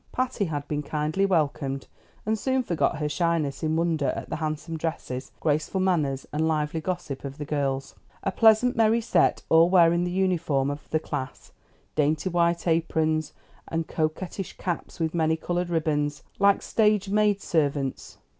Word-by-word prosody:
Patty 255 -5 -1
had 145 -4 -4
been 150 -1 -2
kindly 155 +6 0
welcomed, 145 -6 0 0.4
and 220 +1 +1
soon 260 +1 +1
forgot 170 -7 0
her 150 0 -1
shyness 160 -3 0
in 160 -1 0
wonder 165 -4 +1
at - - -7
the - - -1
handsome 155 +1 -3
dresses, 155 -5 -4
graceful 155 +4 0
manners, 155 -8 +1
and 155 +2 +1
lively 155 0 -1
gossip 175 -5 -4
of 140 0 -6
the 150 - -5
girls. 140 -2 -2 0.3
A 195 - 0
pleasant, 225 +4 +4
merry 225 0 +4
set, 230 - +2
all 165 +1 +6
wearing 170 -1 +5
the 180 - -1
uniform 170 -7 +1
of 145 +1 -8
the 155 - +2
class, 130 -4 -6 0.4
dainty 155 +4 +1
white 170 0 +1
aprons 160 -2 +1 0.3
and 165 0 -2
coquettish 165 +4 -3
caps 175 -1 -4
with 160 -1 -1
many 160 -1 +2
colored 175 +1 -2
ribbons, 150 -3 0 0.2
like 200 0 +4
stage 210 -3 +2
maid 210 0 +3
servants. 145 -6 -1
160 Hz, 160 wpm, -26 LUFS, 150-180 Hz, 0.4 s, all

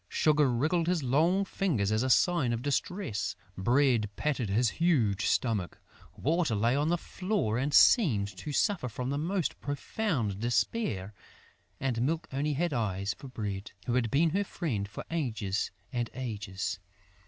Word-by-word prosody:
Sugar 150 -3 +3
wriggled 160 +8 +1
his 175 -4 +1
long 165 +10 +2
fingers 145 - 0
as 110 +1 +2
a 130 - 0
sign 145 -3 +3
of 115 +1 -3
distress; 145 - -2 0.2
Bread 120 +1 +2
patted 135 -8 -1
his 115 +5 +3
huge 120 - +2
stomach; 105 -8 0 0.4
Water 160 -4 +1
lay 115 +5 +2
on 145 +2 +1
the 175 - +2
floor 185 - -1
and 140 +3 -1
seemed 140 - +5
to 150 - -5
suffer 165 - +1
from 125 +4 -4
the 140 - -1
most 175 +2 -1
profound 140 - -2
despair; 115 - -1 0.7
and 125 -4 -1
Milk 160 +5 0
only 145 +2 0
had 170 +2 0
eyes 100 -4 -1
for 140 - -11
Bread, 105 -5 -5
who 120 - -1
had 120 -2 +1
been 155 +5 +3
her 200 +4 +1
friend 120 - -3
for 100 - -8
ages 110 - -1 0.2
and 120 -2 -1
ages. 105 -7 -4
130 Hz, 155 wpm, -30 LUFS, 110-160 Hz, 0.7 s, seemed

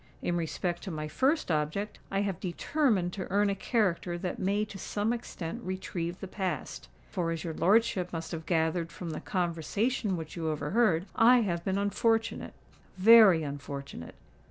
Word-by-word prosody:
In 175 - 0
respect 175 +1 -2
to 195 - -6
my 155 -3 -4
first 270 - +1
object, 155 +7 -1
I 195 0 0
have 195 -3 -2
determined 195 - 0
to 190 -3 -5
earn 200 +1 +3
a - - -1
character 185 -5 0
that 180 0 -4
may 200 +3 +1
to 200 -2 -10
some 210 +5 -1
extent 230 -3 -6
retrieve 180 -2 -4
the 195 - -5
past;—for, 165 - -4
as 165 -1 -3
your 165 - -4
lordship 195 -1 +2
must 165 -1 -5
have 160 -2 -6
gathered 165 0 0
from 170 -3 -6
the 155 - -5
conversation 185 - -1
which 160 -1 -7
you 165 -2 -2
overheard, 165 +4 +1
I 245 +2 +6
have 170 -5 -1
been 190 +1 0
unfortunate—very 215 -2 +3
unfortunate!" 140 - -7
180 Hz, 155 wpm, -29 LUFS, 165-205 Hz, -, I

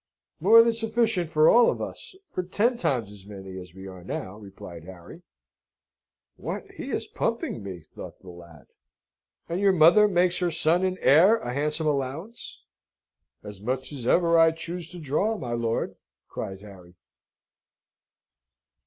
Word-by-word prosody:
"More 230 0 +7
than 230 0 +2
sufficient 225 -6 0
for 155 0 +4
all 240 0 +6
of - - -2
us - - -7 0.2
for - - -2
ten 205 +7 0
times 125 - -1
as 100 -1 -14
many 95 -2 -9
as 90 -1 -12
we 95 0 -10
are 95 -2 -10
now," 95 +1 -5
replied 90 -5 -11
Harry. 90 -2 -12 1.2
("What, - - -5
he - - -8
is - - -2
pumping - - -3
me," 95 -3 -7
thought 80 - -11
the 95 - -12
lad.) 85 -5 -14 0.8
"And 170 +3 -3
your 200 -1 +4
mother 180 +5 +6
makes 180 -2 +1
her 180 -1 +1
son 165 +2 +1
and 185 0 0
heir 180 +10 +6
a 125 - -5
handsome 150 +3 -1
allowance?" 150 - -4 0.8
"As 105 -2 -10
much 130 +6 -3
as 130 -5 -6
ever 170 +1 +4
I 165 0 +5
choose 170 +1 -6
to 180 - -10
draw, 175 +9 -1
my 120 -8 -6
lord!" 115 -1 -2 0.3
cried 95 0 -6
Harry. 95 -4 -14
150 Hz, 155 wpm, -26 LUFS, -, 1.2 s, More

